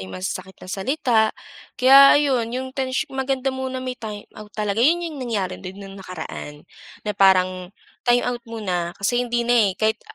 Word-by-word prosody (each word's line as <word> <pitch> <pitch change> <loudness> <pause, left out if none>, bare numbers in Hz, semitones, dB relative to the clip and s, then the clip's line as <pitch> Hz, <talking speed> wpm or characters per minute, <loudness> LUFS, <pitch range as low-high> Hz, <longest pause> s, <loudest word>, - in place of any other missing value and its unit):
yung 95 - -9
masasakit 175 - -5
na - - -12
salita 230 +3 +1 0.6
kaya 275 +3 +8
ayon 260 -6 +1
'yong 260 +1 -4
tensy 265 +2 -1
maganda 265 0 -1
muna 260 0 -4
may 255 0 -4
timeout 210 -1 -9
talaga 210 +1 -1
'yon 340 +4 +4
'yong 320 -3 -6
nangyari 215 -7 -2
din 185 +1 -8
nung 195 0 -10
nakaraan, 160 -5 -8 0.5
na - - 0
parang 185 -2 +3 0.4
timeout 245 0 +2
muna 180 -6 -3
kasi 240 +5 0
hindi 240 -1 -1
na 240 +1 +2 0.2
eh. - - -4
Kahit 220 0 0
230 Hz, 165 wpm, -22 LUFS, 190-260 Hz, 0.6 s, kaya